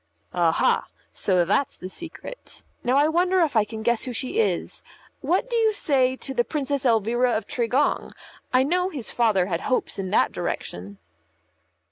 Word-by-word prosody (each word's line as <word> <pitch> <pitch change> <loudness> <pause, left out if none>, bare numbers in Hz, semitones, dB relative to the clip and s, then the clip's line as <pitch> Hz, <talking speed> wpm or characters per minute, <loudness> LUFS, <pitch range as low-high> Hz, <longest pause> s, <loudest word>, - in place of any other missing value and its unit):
"Aha! 170 -2 +2 0.3
So 180 -3 +2
that's 225 +9 0
the 185 - -7
secret. 335 - -10 0.2
Now 250 +2 +2
I 290 +2 +5
wonder 360 +3 +2
if 310 -6 +1
I 220 - +5
can 220 0 -7
guess 235 0 +1
who 250 - -4
she 265 - -2
is. 450 - 0 0.4
What 370 +8 0
do 485 - -3
you 445 -2 +3
say 260 -9 +1
to 270 +1 -6
the 240 -2 +2
Princess 280 0 -1
Elvira 235 +2 +2
of 215 - -5
Tregong? 245 +4 0 0.4
I 255 0 +4
know 360 +6 +1
his 280 -10 -5
father 215 -6 +2
had 170 -3 -2
hopes 255 -5 -1
in 190 -1 -3
that - - +3
direction." 95 +3 -5
255 Hz, 170 wpm, -24 LUFS, 220-310 Hz, 0.4 s, I